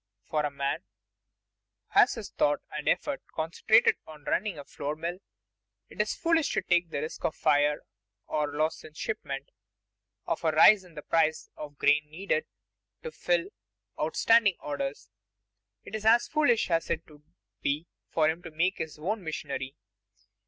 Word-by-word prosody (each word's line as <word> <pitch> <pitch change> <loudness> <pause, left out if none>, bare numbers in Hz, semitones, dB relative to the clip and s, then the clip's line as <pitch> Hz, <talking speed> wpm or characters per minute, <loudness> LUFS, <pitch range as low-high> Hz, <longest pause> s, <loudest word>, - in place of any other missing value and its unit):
For 150 -1 0
a 150 - 0
man 140 -1 -2
who 100 0 -7
has - - +5
his - - -7
thought 145 0 +1
and 150 -1 -2
effort 285 -2 0
concentrated 170 +8 +3
on 155 -2 -12
running 200 +3 -1
a 145 - -8
flour 145 +2 -4
mill, 170 +3 -4 0.7
it - - -2
is - - -1
foolish 330 -2 +2
to - - 0
take 175 -1 +2
the 145 - -3
risks 155 - -6
of 155 - 0
fire, 150 -1 +2 0.4
of 150 -1 0
loss 155 +2 -1
in 155 -1 -13
shipment, 220 - -4 0.7
of - - -2
a - - +2
rise 210 -3 +7
in 175 -3 -17
the 150 - -7
price 160 -1 +1
of 145 -1 -9
grain 150 +2 +3
needed 160 -1 -1 0.6
to 475 - -5
fill 175 - 0 0.5
outstanding 200 +6 +4
orders 145 -1 -4 0.7
it - - -12
is 220 -1 -3
as 230 +2 +5
foolish 290 - +2
as 165 0 +1
it 165 - -2
would 150 -2 -17 0.4
be 145 +4 -1 0.2
for 155 -2 +2
him 160 +2 -1
to 170 - -8
make 170 +5 0
his 160 -1 -5
own 195 +7 -2
machinery. 140 -4 -4
155 Hz, 165 wpm, -29 LUFS, 150-185 Hz, 0.7 s, rise